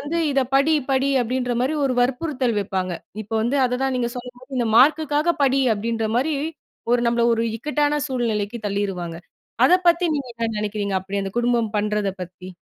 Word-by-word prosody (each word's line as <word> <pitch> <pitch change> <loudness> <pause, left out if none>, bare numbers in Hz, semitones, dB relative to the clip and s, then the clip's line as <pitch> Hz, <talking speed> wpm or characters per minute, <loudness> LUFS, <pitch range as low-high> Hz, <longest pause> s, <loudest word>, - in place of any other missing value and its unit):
வந்து, 320 +4 -2
இத 270 - +3
படி 290 +4 +4 0.2
படி 270 +1 +2
அப்படின்ற 245 +1 -1
மாரி, 285 +5 0
ஒரு 260 - +1
வற்புறுத்தல் 255 -2 0
வப்பாங்க. 185 -2 -2 0.3
இப்ப 215 - -13
வந்து, 250 +5 0
அதுதா, 250 +2 -1
நீங்க 240 -1 -1
சொன்ன, 245 0 -9
இந்த 235 - +1
மார்க்குக்காக 305 +4 +4
படி. 270 0 +3
அப்படின்ற 225 +1 -2
மாரி 285 +6 +1 0.6
ஒரு 245 - +3
நம்மள 235 0 +1
ஒரு, 230 - -1
இக்கட்டான 295 +3 0
சூழ்நிலைக்கு 230 -3 -1
தள்ளிருவாங்க. 195 -4 -3 0.5
அத - - +5 0.2
பத்தி, 345 +1 +3
நீங்க 270 -3 -4
என்ன 230 -1 -1
நெனக்கிறீங்க? 205 -1 -2
அப்படி 200 +2 -3
அந்த 195 - -4
குடும்பம் 235 -2 +1
பண்றத 210 -1 0
பத்தி 180 +1 -10
245 Hz, 165 wpm, -22 LUFS, 210-275 Hz, 0.6 s, அத